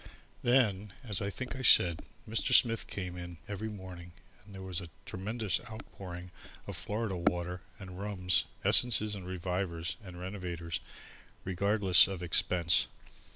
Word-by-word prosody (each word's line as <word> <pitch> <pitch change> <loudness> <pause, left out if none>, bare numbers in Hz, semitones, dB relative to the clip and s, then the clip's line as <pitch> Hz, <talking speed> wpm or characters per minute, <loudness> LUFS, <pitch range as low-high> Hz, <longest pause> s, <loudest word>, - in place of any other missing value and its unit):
Then, 105 -6 +2
as 105 -7 -1
I 100 - -1
think 125 +6 -5
I 130 - -5
said, 85 -9 +6 0.3
Mr. 110 +1 +2
Smith 115 -2 +4
came 90 -3 -5
in 85 -1 -8
every 105 +2 -4
morning 90 -4 -9 0.3
and 100 0 -14
there 95 - -8
was 95 -1 -3
a 85 - -9 0.2
tremendous 105 +2 -1
outpouring 90 -5 -9 0.3
of - - -6
Florida 105 -2 -3
water 90 +1 -1 0.2
and 95 -2 -9
rums, 95 -3 +1 0.2
essences 110 -3 +5
and 95 -3 -6
revivers 90 -3 -3
and 90 -2 -10
renovators, 90 -3 -4 0.7
regardless 95 0 +5
of 95 -2 -5
expense. 85 0 +3
95 Hz, 140 wpm, -32 LUFS, 90-105 Hz, 0.7 s, said